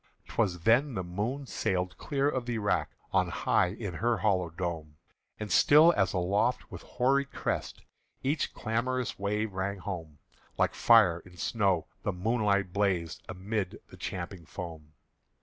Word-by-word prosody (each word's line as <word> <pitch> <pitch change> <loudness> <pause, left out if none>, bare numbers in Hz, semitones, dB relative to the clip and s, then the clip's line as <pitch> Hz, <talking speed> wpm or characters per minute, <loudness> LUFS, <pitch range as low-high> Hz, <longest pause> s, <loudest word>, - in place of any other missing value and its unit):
'T - - -11
was 90 -6 +1
then 120 - +3
the 95 - -2
moon 105 +11 -3
sailed 90 -6 -1
clear 140 -1 0
of 130 -4 -1
the 120 -1 -1
rack 105 -1 0 0.2
On - - +3
high - - +2
in 100 0 -5
her 115 +6 +1
hollow 95 -5 +1
dome; 80 -3 -5 0.4
And 105 -2 -5
still 150 - +7
as 95 -3 +2
aloft 100 +7 0
with - - -8
hoary 135 +3 +1
crest 140 - -4 0.4
Each 140 +3 0
clamorous 120 +1 -2
wave 105 +1 -1
rang 95 +1 -2
home, 85 -6 -6 0.4
Like - - +2
fire 105 -8 +5
in 90 +1 -16
snow 95 -5 +1 0.2
the - - -1
moonlight 100 -1 +1
blazed 95 -5 0
Amid 95 0 -3
the - - -10
champing 90 -2 -6
foam. 80 -4 -8
100 Hz, 150 wpm, -30 LUFS, 90-115 Hz, 0.4 s, still